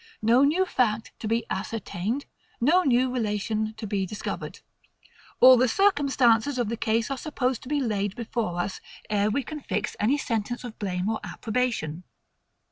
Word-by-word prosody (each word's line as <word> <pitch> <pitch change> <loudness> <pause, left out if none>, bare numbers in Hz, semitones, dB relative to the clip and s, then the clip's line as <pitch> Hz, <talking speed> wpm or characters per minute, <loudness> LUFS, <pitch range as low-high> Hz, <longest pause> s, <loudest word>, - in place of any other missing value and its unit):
No 235 +5 +5
new 325 +7 +3
fact 230 -9 0
to 220 - -4
be 230 +2 0
ascertained; 210 +4 -3 0.3
no 315 +10 +4
new 255 -4 +2
relation 215 -1 -1
to 220 0 -6
be 200 -1 -1
discovered. 210 - -6 0.8
All 255 0 +9
the 255 +2 +4
circumstances 275 - +3
of 240 -4 0
the 230 - -1
case 225 +2 0
are 275 - -1
supposed 260 -5 -1
to 250 - -10
be 295 -1 +1
laid 205 -5 -1
before 225 -6 -3
us, 185 +2 -3 0.3
ere 205 0 +2
we 260 +6 0
can 310 +2 -6
fix - - -3
any 245 +8 +2
sentence 240 -2 -2
of 240 -3 -8
blame 185 -2 -2
or 220 0 0
approbation. 220 -9 -2
230 Hz, 165 wpm, -26 LUFS, 210-260 Hz, 0.8 s, All